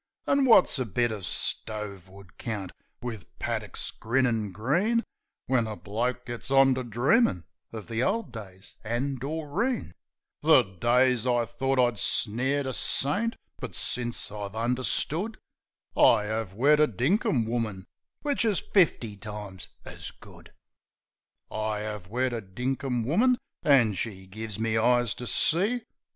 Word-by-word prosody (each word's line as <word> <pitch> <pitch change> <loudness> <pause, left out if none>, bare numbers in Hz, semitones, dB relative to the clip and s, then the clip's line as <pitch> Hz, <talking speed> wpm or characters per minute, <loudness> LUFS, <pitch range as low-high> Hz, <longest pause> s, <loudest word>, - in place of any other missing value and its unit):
An' 275 -1 +3
wot's 210 - +5
a 130 - 0
bit 120 +3 0
uv 105 -3 -6
stove 100 -1 -4
wood 95 -1 -16
count, 100 -6 -4 0.3
wiv 115 -6 -5
paddicks - - -3
grinnin' 115 -3 0
green, 175 - +1 0.4
When 125 -4 +1
a 110 - -4
bloke 120 +5 -3
gits 120 +1 -5
on 135 0 +5
to 130 0 -3
dreamin' 120 - +2 0.3
uv 110 -2 -7
the 115 0 -2
old 200 - 0
days 100 -4 -10
an' 125 +4 -2
Doreen 160 - -2 0.5
The 150 -4 +6
days 120 +6 +1
I 120 -1 +2
thort 135 +5 -2
I 120 -1 +3
snared 130 +8 +2
a 130 - -3
saint; 205 - +2 0.2
but - - -7
since 120 -3 -2
I've 100 -1 -6
under 120 +3 -1
stood 190 - +3 0.6
I 105 -1 +5
'ave 110 -4 -3
wed 145 +6 +4
a 150 - +5
dinkum 125 - +1
woman, 110 -5 -3 0.4
which 285 -4 0
is 215 -5 +1
fifty 135 - +1
times 105 -2 -8 0.2
as - - -7
good. - - -16 1.0
I 110 -1 -2
'ave 105 -4 -6
wed 125 +3 0
a 115 - -3
dinkum 125 +4 -3
woman, 235 - +3 0.2
an' 125 -7 +4
she's 95 -1 -5
give 110 +1 -6
me 110 0 +1
eyes 120 -1 +3
to 125 - -7
see. 210 - +3
120 Hz, 145 wpm, -27 LUFS, 105-140 Hz, 1.0 s, The